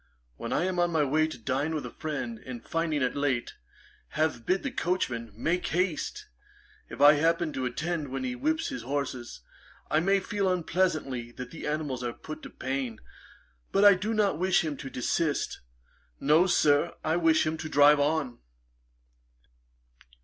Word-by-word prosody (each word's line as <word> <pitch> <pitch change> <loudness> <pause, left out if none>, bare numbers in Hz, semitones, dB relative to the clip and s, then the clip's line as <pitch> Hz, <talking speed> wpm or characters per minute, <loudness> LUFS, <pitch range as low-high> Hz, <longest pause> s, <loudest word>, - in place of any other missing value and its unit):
When - - -6
I - - +1
am 185 -1 -1
on 175 0 +3
my 160 -3 +2
way 155 +3 +2
to 160 - -7
dine 140 +6 -1
with 150 - -3
a - - -7
friend, 155 +9 -4
and 240 -2 -8
finding 160 -4 0
it 125 - 0
late, 140 -4 -1 0.6
have 150 -7 0
bid 190 - +1
the 275 - -2
coachman 130 - -2
make 170 +10 -1
haste, 175 -2 -1 0.6
if - - -9
I 145 +1 +9
happen 165 +1 +1
to 130 -1 -1
attend 155 +4 -3
when 135 - -4
he 250 -1 -2
whips 315 +5 0
his 275 - -5
horses, 130 - -4 0.5
I 155 - +4
may 195 +4 +3
feel 195 0 -1
unpleasantly 155 -9 -1
that 125 0 -8
the 165 - -7
animals 150 -4 -2
are 120 -1 -2
put 155 0 -9
to - - -9
pain, 130 -4 -4 0.7
but 200 +1 +4
I 205 - +10
do 200 +4 -2
not 200 -7 +1
wish 185 0 +3
him 150 -2 -2
to 135 - -7
desist. 145 +4 -1 0.6
No, 155 +6 +4
Sir, 150 -2 +3
I 160 +1 +1
wish 165 -2 +3
him 155 +1 0
to 160 0 -6
drive 145 0 +6
on.' 145 -4 0
155 Hz, 170 wpm, -28 LUFS, 140-180 Hz, 0.7 s, I